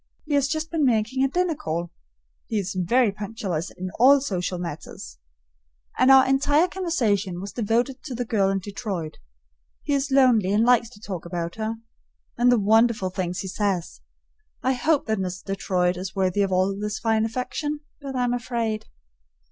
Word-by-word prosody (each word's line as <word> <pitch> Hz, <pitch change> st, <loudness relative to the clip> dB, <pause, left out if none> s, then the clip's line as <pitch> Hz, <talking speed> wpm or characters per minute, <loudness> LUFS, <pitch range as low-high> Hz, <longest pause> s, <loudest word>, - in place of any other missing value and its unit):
He 300 Hz, -, -3 dB
has 280 Hz, -1 st, +3 dB
just 315 Hz, +2 st, -3 dB
been 325 Hz, -3 st, 0 dB
making 245 Hz, +1 st, +2 dB
a -, -, +4 dB
dinner 355 Hz, +4 st, 0 dB
call 170 Hz, -, -4 dB, 0.6 s
(he 220 Hz, -, -2 dB
is 195 Hz, -2 st, -2 dB
very 205 Hz, +5 st, +2 dB
punctilious 195 Hz, -5 st, -4 dB
in 185 Hz, 0 st, -7 dB
all 275 Hz, +4 st, +7 dB
social 185 Hz, -8 st, -2 dB
matters), 170 Hz, -3 st, -7 dB, 0.8 s
and 255 Hz, -, +5 dB
our 265 Hz, -1 st, +8 dB
entire 285 Hz, +5 st, +3 dB
conversation 220 Hz, -, -1 dB
was 200 Hz, +2 st, -6 dB
devoted 240 Hz, +3 st, 0 dB
to 265 Hz, -5 st, -5 dB
the 245 Hz, +1 st, -2 dB
girl 200 Hz, -4 st, +1 dB
in 195 Hz, -, +1 dB
Detroit. 195 Hz, -5 st, -5 dB, 0.6 s
He 290 Hz, -, -1 dB
is 280 Hz, 0 st, 0 dB
lonely 245 Hz, -8 st, +4 dB
and 215 Hz, +2 st, +3 dB
likes 240 Hz, -2 st, +4 dB
to 205 Hz, -, -16 dB
talk 190 Hz, -5 st, -6 dB
about 170 Hz, -1 st, -4 dB
her; 220 Hz, +1 st, -2 dB, 0.6 s
and 245 Hz, +1 st, +4 dB
the 245 Hz, -, +4 dB
wonderful 220 Hz, -2 st, +3 dB
things 180 Hz, -1 st, -3 dB
he 190 Hz, -, -6 dB
says! 190 Hz, -3 st, -2 dB, 0.6 s
I 260 Hz, -, +2 dB
hope 285 Hz, +4 st, +1 dB
that 220 Hz, -2 st, -1 dB
Miss 185 Hz, 0 st, -4 dB
Detroit 185 Hz, -2 st, 0 dB
is 185 Hz, +1 st, -6 dB
worthy 190 Hz, +1 st, +1 dB
of 195 Hz, -1 st, +1 dB
all 185 Hz, +1 st, +2 dB
this 210 Hz, +1 st, -3 dB
fine 225 Hz, -1 st, +1 dB
affection, 275 Hz, +6 st, -3 dB, 0.2 s
but 275 Hz, -1 st, -6 dB
I'm 245 Hz, -1 st, +1 dB
afraid. 230 Hz, -3 st, -2 dB
220 Hz, 175 wpm, -24 LUFS, 190-260 Hz, 0.8 s, our